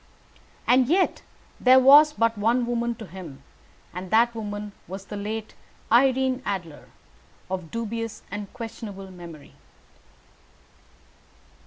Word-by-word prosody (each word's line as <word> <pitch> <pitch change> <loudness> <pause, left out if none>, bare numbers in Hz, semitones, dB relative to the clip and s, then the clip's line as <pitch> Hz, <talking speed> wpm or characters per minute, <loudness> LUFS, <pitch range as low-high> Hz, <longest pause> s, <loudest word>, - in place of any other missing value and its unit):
And 250 0 +4
yet 365 +6 +2 0.4
there 255 0 +6
was 285 +4 +8
but 230 -4 +1
one 230 +4 +1
woman 235 0 -1
to 220 - -9
him, 170 -8 -10 0.5
and 180 +1 -6
that 235 +3 +4
woman 210 -2 -5 0.2
was 190 +2 -7
the 210 - -7
late 215 +2 -5 0.4
Irene 260 +1 +3
Adler, 170 - -5 0.6
of 180 -4 -4
dubious 230 +1 -4
and 205 -1 -6
questionable 215 -5 -8
memory. 170 -5 -12
220 Hz, 115 wpm, -25 LUFS, 195-240 Hz, 0.6 s, was